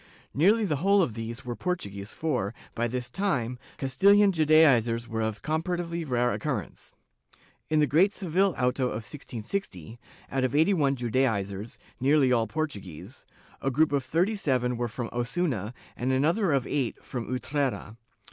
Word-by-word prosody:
^ - - -25 0.3
Nearly 210 +9 +4
the 155 -7 0
whole 195 +5 +4
of 120 - -2
these 115 +3 -6
were 120 -1 -4
Portuguese 100 - -3
for, 125 -9 -2 0.2
by 120 +1 0
this 125 +1 -3
time, 125 - -1 0.2
CastiUan 200 +10 +4
Judaizers 140 - +4
were 115 -1 -3
of 110 +1 -3
comparatively 170 +2 -2
rare 125 -3 +1
occurrence. 130 - -4 0.8
In 155 -1 +3
the - - +5
great 165 +9 +4
Seville 190 -1 +1
auto 125 +1 +1
of 115 -3 -3
1660, 120 - -5 0.3
out 135 -1 0
of 130 +1 0
eighty 160 +7 +4
one 140 -6 +2
Judaizers, 110 -5 -1 0.2
nearly 135 0 +3
all 115 -2 +2
Portu 155 -10 -3
guese, 85 -6 -10 0.4
a 135 - 0
group 150 +4 +2
of 140 -1 +1
thirty 170 +11 +1
seven 125 - 0
were 120 0 -1
from 115 +1 -5
Osuna 120 - -1 0.2
and 125 +2 -1
another 165 +8 +2
of 135 -3 +1
eight 135 -5 -2
from 120 -3 -5
Utrera. 130 -4 -2
130 Hz, 160 wpm, -27 LUFS, 120-160 Hz, 0.8 s, the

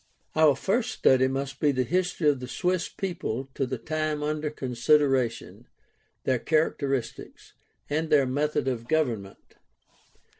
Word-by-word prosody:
Our 155 -3 +5
first 220 - 0
study 130 - +3
must 135 0 -4
be 150 - +3
the 130 -2 0
history 180 +2 0
of 145 -3 +3
the 125 - -6
Swiss 180 +6 -1
people 135 - -4
to 135 - -1
the 130 - -3
time 155 +1 -2
under 150 0 -1
consideration, 130 -2 0 0.6
their 130 -2 +1
characteristics, 140 -4 -2 0.3
and 155 +2 -1
their 145 -3 +4
method 145 +2 -1
of 120 -3 -2
government. 120 -11 -2
145 Hz, 135 wpm, -27 LUFS, 130-155 Hz, 0.6 s, Our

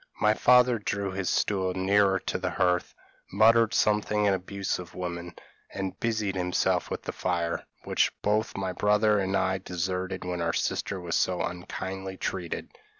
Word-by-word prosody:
My 105 0 +4
father 125 0 +5
drew 100 -1 -2
his 95 -1 -2
stool 95 -3 0
nearer 95 +1 +3
to - - -3
the - - -1
hearth, 90 -1 0 0.4
muttered 115 +2 +5
something 105 0 +2
in 100 - +4
abuse 95 +1 -3
of 90 0 -10
women, 85 -1 -5 0.4
and 95 -1 -4
busied 110 -4 0
himself 90 -1 0
with - - -4
the - - -4
fire, 85 -2 -2 0.2
which - - +2
both 105 +1 0
my 95 -1 -2
brother 105 +2 +3
and 95 0 0
I 95 - +1
had 95 0 -3
deserted 90 +1 -3
when 90 -1 -3
our 85 0 0
sister 100 - -1
was 85 -2 -5
so 90 -1 +1
unkindly 95 +1 -5
treated. 90 -3 -4
95 Hz, 165 wpm, -27 LUFS, 90-105 Hz, 0.4 s, father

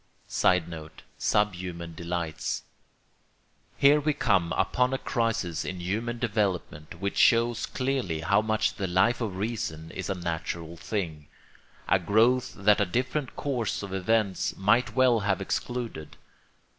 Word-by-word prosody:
[Sidenote: 80 -3 0 0.2
Subhuman 90 -5 -1
delights.] 85 -1 -3 1.1
Here 145 +2 +6
we 150 +1 +1
come 95 - +2
upon 125 +7 +1
a - - 0
crisis 115 - -1
in 90 0 -5
human 110 +7 -2
development 100 -9 -2
which 100 +1 -2
shows 115 0 +4
clearly 130 -12 -1
how 100 +5 +3
much 110 0 +1
the 95 - -1
Life 95 +8 +2
of 105 -5 -3
Reason 95 -7 -3
is - - -5
a 95 - 0
natural 85 -1 -4
thing, 80 -5 -4 0.6
a 95 - +4
growth 115 +7 +2
that 105 +1 +4
a - - +3
different 130 +7 -2
course 125 -8 -2
of 100 -1 -6
events 100 0 0
might 105 +6 +2
well 130 -3 +4
have 100 -1 0
excluded. 115 -4 -4
100 Hz, 130 wpm, -27 LUFS, 85-120 Hz, 1.1 s, Here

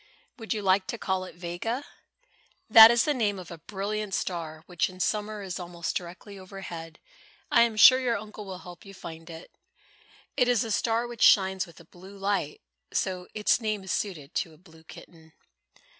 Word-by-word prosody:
Would 225 - -7
you 210 -2 -1
like 190 0 +3
to 235 - -4
call 190 -3 -2
it 185 - -12
Vega? 180 +10 -4 0.8
That 225 0 +11
is 235 -1 +4
the 300 - +2
name 210 -6 0
of 180 -2 -10
a 170 - -9
brilliant 205 +2 -4
star 160 -3 -4
which 180 0 -1
in 185 0 -13
summer 210 +2 -2
is 185 -1 -5
almost 175 -1 -5
directly 185 +3 -7
overhead. 180 -4 -9 0.5
I - - +6
am 235 -2 +3
sure 255 +4 +9
your 245 -3 0
uncle 210 +1 -9
will 190 -2 -7
help 180 -1 -12
you 195 -1 -12
find 165 -2 -10
it. 165 +1 -10 0.8
It 250 -3 +3
is 245 -3 +3
a 225 - -5
star 230 +3 +1
which 240 -1 -9
shines 190 -1 +4
with 170 - -16
a 170 - -15
blue 190 +4 -14
light, 195 -6 -2 0.3
so 185 -2 -2
its 215 +3 +2
name 215 -3 -2
is 190 - -5
suited 170 -7 -3
to 165 -4 -3
a - - -21
blue 160 -2 -19
kitten." 160 0 -15
190 Hz, 190 wpm, -27 LUFS, 175-215 Hz, 0.8 s, That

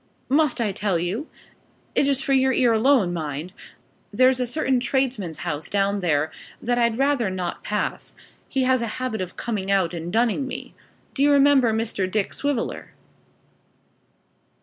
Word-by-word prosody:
"Must 285 -1 +2
I 220 -4 +1
tell 195 -2 -1
you? 190 - -3 0.7
It 280 - +2
is 275 -1 +1
for 280 -3 +1
your 265 0 +4
ear 245 -2 +3
alone, 225 -5 +3
mind. 155 +1 -4 0.6
There's 255 +4 +4
a 250 - 0
certain 265 -1 +1
tradesman's 245 - -1
house 150 +1 -3
down 200 0 +1
there 155 -4 +1 0.3
that 245 +1 0
I'd 235 -1 +2
rather 270 -5 +2
not 180 -2 -4
pass; 210 0 -3 0.3
he 265 -1 0
has 255 -1 +2
a 235 - -1
habit 255 -5 -3
of 180 -1 -6
coming 205 -5 -3
out 190 -3 +2
and 170 0 -5
dunning 235 +5 +1
me. - - -7 0.4
Do 275 - -3
you 290 +1 +5
remember 280 -4 +5
Mr. 220 -4 -1
Dick 205 0 -1
Swiveller?" 285 -5 -3
230 Hz, 160 wpm, -23 LUFS, 190-265 Hz, 0.7 s, you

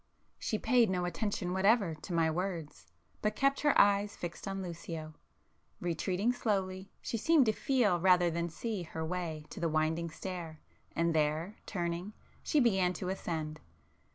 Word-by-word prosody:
She 215 - -1
paid 240 -1 +4
no 180 -1 0
attention 180 +1 -2
whatever 195 -1 +3
to 155 +4 -9
my 165 -2 +3
words, 170 -3 -4 0.3
but 210 0 0
kept 275 +2 +2
her 295 -1 +4
eyes 205 0 +4
fixed 175 +3 -6
on 195 0 -3
Lucio. 165 -2 -6 0.7
Retreating 180 +6 0
slowly, 195 -5 -1
she 230 - -2
seemed 305 +4 +4
to 220 - +4
feel 215 -6 +2
rather 180 -1 +5
than 170 +1 -1
see 215 +4 -3
her 160 -1 -4
way 160 -3 -3
to - - -7
the 170 -1 +1
winding 160 +2 0
stair, 165 -1 -6 0.4
and 170 0 +2
there, 155 +6 0
turning, 175 +1 -3 0.3
she 305 - +2
began 190 -8 +3
to 180 +1 -4
ascend. 160 -5 -3
180 Hz, 155 wpm, -32 LUFS, 165-205 Hz, 0.7 s, rather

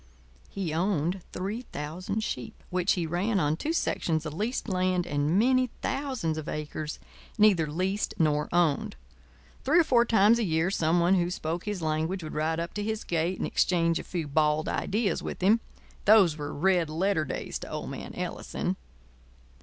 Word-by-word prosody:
He 185 -6 -3
owned 180 +1 0
3,000 195 -1 -4
sheep, 125 - -5
which 180 +1 +2
he 175 -4 -1
ran 190 +6 0
on 150 -2 +1
two 295 - -2
sections 165 - 0
of 150 - -4
leased 220 +11 -2
land 185 -2 +1
and 145 +4 +1
many 255 +3 +3
thousands 255 - -1
of 155 - -6
acres 150 0 -4 0.4
neither 200 -7 +5
leased 185 +7 -1
nor 150 -2 +1
owned. 170 - +1 0.7
Three 310 +6 +4
or - - +6
four 245 -6 +4
times 225 0 +5
a - - +1
year 165 0 +1
some 165 -1 +2
one 175 +2 +4
who 175 -2 +2
spoke 170 0 -3
his 205 -5 -3
language 160 +4 -1
would 155 - -6
ride 160 +2 0
up 170 +1 -4
to 210 - -3
his 220 0 -2
gate 170 +2 -1
and - - -2
exchange 170 -2 +2
a - - -6
few 170 -4 -4
bald 150 +1 +2
ideas 210 +1 0
with - - -5
him. 215 +5 +5 0.5
Those 200 -7 +6
were 150 -1 -5
red 175 0 +2
letter 170 +1 +1
days 135 - -4
to - - -8
old - - -5
man - - -7
Ellison. - - -3
175 Hz, 175 wpm, -28 LUFS, 155-205 Hz, 0.7 s, or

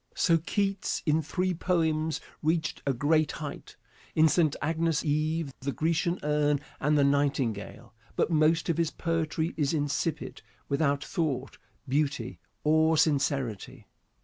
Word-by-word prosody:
So 165 -1 +3
Keats 195 +3 -1
in 155 0 +3
three 180 +4 -1
poems 160 -3 0 0.2
reached 160 +1 0
a 140 - +3
great 155 +4 +2
height - - -7 0.4
in 160 0 +6
"St. 155 -2 +2
Agnes' 165 0 0
Eve," 155 0 0
"The 140 +1 -2
Grecian 170 +4 0
Urn," 150 -1 +2 0.2
and 150 +1 +2
"The 145 - +4
Nightingale" 140 -6 -1 0.2
but - - +1
most 160 +1 +3
of 170 -2 0
his 165 -2 +2
poetry 165 -1 -2
is 150 0 +1
insipid, 145 +2 -2 0.3
without 140 -1 +1
thought, 140 -7 -3 0.3
beauty 135 - -1 0.2
or 160 +1 +4
sincerity. 140 - 0
155 Hz, 130 wpm, -28 LUFS, 145-165 Hz, 0.4 s, in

